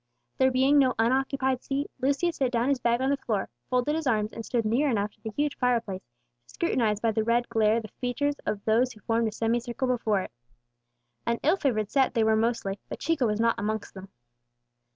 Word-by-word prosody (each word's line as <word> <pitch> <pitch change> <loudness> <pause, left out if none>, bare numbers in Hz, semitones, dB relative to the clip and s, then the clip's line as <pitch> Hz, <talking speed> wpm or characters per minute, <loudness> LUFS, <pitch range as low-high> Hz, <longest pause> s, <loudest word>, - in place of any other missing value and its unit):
There 260 0 +5
being 265 +3 +4
no 260 -2 +3
unoccupied 260 +2 +1
seat, 280 +1 -3
Lucius 285 +6 0
set 260 -3 +1
down 240 +2 +1
his 275 -2 +1
bag 235 0 +1
on 265 +1 +1
the 280 - +1
floor, 215 -7 -2 0.2
folded 250 +4 +1
his 320 -2 -2
arms, 215 -3 +1
and 225 - -6
stood 235 -1 -1
near 250 +7 +2
enough 210 -3 0
to 215 - -31
the 220 - -5
huge 290 +6 -1
fireplace 235 -7 0 0.5
to - - -17
scrutinize 225 - +1
by 225 0 +1
the 220 0 0
red 235 +2 +1
glare 220 -1 +3
the 220 - -8
features 285 +6 -2
of 200 -1 -2
those 235 +4 +2
who 215 - -18
formed 230 +1 +1
a - - -2
semicircle 240 +4 -1
before 225 -5 +1
it. - - -7 1.0
An 235 0 +1
ill 320 +5 +4
favoured 215 - 0
set 270 -2 +2
they 225 - +3
mostly 220 -1 +1
were, 195 - -5
but - - -6
Chico 295 -7 +1
was 210 0 -1
not 230 0 +2
amongst 215 0 -3
them. 190 0 -10
235 Hz, 215 wpm, -27 LUFS, 220-265 Hz, 1.0 s, There